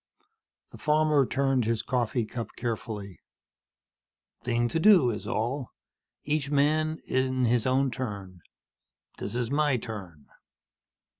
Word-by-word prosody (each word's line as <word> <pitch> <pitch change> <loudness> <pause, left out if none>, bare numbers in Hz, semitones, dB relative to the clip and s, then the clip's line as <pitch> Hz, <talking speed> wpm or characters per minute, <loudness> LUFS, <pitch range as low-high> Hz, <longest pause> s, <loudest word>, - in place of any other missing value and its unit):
The - - -12
farmer 150 -3 +3
turned 135 -3 +1
his 110 -1 0
coffee 120 -2 0
cup 115 0 -5
carefully. 110 -5 -5 1.2
"Thing 120 0 +1
to 165 - 0
do, 175 - +6
is 105 - -6
all. 125 +4 -2 0.5
Each 150 -1 -1
man 155 +2 +2
in 130 -1 +1
his 120 +1 +2
own 130 +1 +2
turn. 100 -8 -6 0.8
This - - -5
is 120 0 -1
my 145 -2 +2
turn." 95 -10 -8
125 Hz, 120 wpm, -28 LUFS, 115-140 Hz, 1.2 s, do